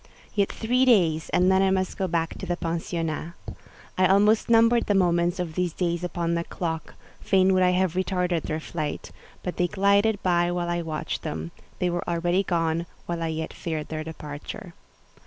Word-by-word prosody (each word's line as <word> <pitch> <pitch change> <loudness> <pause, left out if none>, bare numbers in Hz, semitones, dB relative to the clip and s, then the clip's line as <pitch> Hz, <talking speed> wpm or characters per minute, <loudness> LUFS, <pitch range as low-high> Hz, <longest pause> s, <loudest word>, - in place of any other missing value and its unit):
Yet 200 -2 +1
three 250 +3 +1
days, 170 -11 +3
and 180 +1 +3
then 190 0 +4
I 195 - +3
must 190 -1 0
go 190 - -1
back 165 -1 -1
to - - -6
the 175 - -1
pensionnat. 165 -1 -3 0.7
I 185 - +5
almost 210 +4 +4
numbered 230 +1 +4
the 205 - +2
moments 175 -1 +2
of 175 -3 -3
these 180 -1 -1
days 170 -1 -1
upon 170 -1 -1
the 170 0 0
clock; 160 -2 -4 0.2
fain 190 -1 +3
would 185 - +3
I 180 - +5
have 180 -1 +1
retarded 180 -2 0
their 155 +1 -3
flight; 155 -2 -5 0.3
but 180 - -4
they 180 - +2
glided 200 +3 +3
by 175 -1 +2
while 175 -1 -2
I 175 0 0
watched 160 -2 -4
them: 80 +2 -5 0.3
they 180 -1 0
were 175 0 -3
already 175 +2 +1
gone 170 -2 0 0.2
while 170 -1 -3
I 165 - 0
yet 160 0 -4
feared 160 -3 -4
their 155 -1 -3
departure. 160 +4 -8
175 Hz, 190 wpm, -25 LUFS, 165-190 Hz, 0.7 s, I